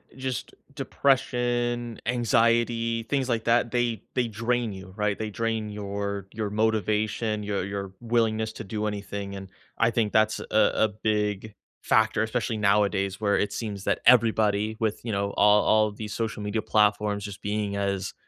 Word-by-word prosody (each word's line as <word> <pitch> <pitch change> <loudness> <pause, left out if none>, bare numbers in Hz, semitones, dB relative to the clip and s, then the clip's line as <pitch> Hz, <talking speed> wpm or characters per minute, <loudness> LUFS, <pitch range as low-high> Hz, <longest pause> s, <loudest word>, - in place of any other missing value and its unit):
just 130 -1 -4 0.2
depression, 120 -3 0
anxiety, 115 -1 +2
things 135 +2 -1
like 115 -3 0
that, 115 0 +2
they 120 -4 0
they 125 -2 +1
drain 120 +1 -1
you, 95 -1 -10
right? 105 -1 0
They 110 -1 -3
drain 110 0 -2
your 100 -1 -4
your 110 -2 -3
motivation, 110 0 0
your 100 -2 -2
your 100 -1 -5
willingness 110 -2 0
to 110 - -7
do 105 +1 -3
anything, 100 -1 -4
and 95 -1 -8 0.3
I 115 - +3
think 110 -2 0
that's 110 0 +3
a - - -6 0.3
a 110 - +3
big 105 0 -2 0.3
factor, 110 0 +2
especially 110 0 -2
nowadays, 100 -2 +1
where 100 -2 +2
it 105 - 0
seems 105 -3 -5
that - - +1
everybody 110 -3 +4
with, 110 -3 -1
you 115 - -3
know, 100 0 -1
all 105 0 +5
all 110 0 +3
these 105 0 -7
social 110 -2 -3
media 105 +2 -2
platforms 105 -1 +1
just 100 -1 -8
being 105 -1 -2
as 100 -1 -2
110 Hz, 160 wpm, -26 LUFS, 100-115 Hz, 0.3 s, all